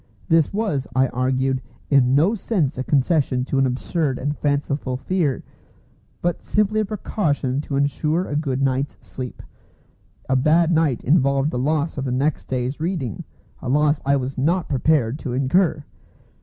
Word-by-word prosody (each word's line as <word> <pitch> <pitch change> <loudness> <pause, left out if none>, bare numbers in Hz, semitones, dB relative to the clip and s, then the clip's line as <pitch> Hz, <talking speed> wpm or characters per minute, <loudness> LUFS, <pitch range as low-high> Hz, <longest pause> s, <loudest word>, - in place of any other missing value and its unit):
This 165 -2 +4
was, 195 -11 -1
I 130 0 +3
argued, 130 +1 0 0.3
in 130 -2 +4
no 165 +9 +4
sense 185 - -1
a 130 - -3
concession 135 -2 +1
to 135 - 0
an 135 - +3
absurd 135 +2 -1
and 145 +3 -2
fanciful 140 -3 -1
fear, 145 0 -1 0.8
but 175 0 0
simply 210 +1 +1
a 215 - +1
precaution 150 - -1
to 145 - -5
ensure 150 +5 0
a 145 - -3
good 135 -3 -1
night's 135 +1 0
sleep. 125 -1 -8 0.8
A 130 - +1
bad 155 +6 +3
night 160 -6 +1
involved 140 0 +2
the 125 - -2
loss 150 +2 0
of 135 - -3
the 130 - -2
next 140 +4 0
day's 130 +2 -2
reading, 160 - -3 0.4
a 125 - -4
loss 150 +2 +2
I 140 +1 +3
was 130 -1 -3
not 170 +6 +1
prepared 140 -2 +1
to 125 - -4
incur. 150 +3 +1
140 Hz, 160 wpm, -22 LUFS, 130-160 Hz, 0.8 s, This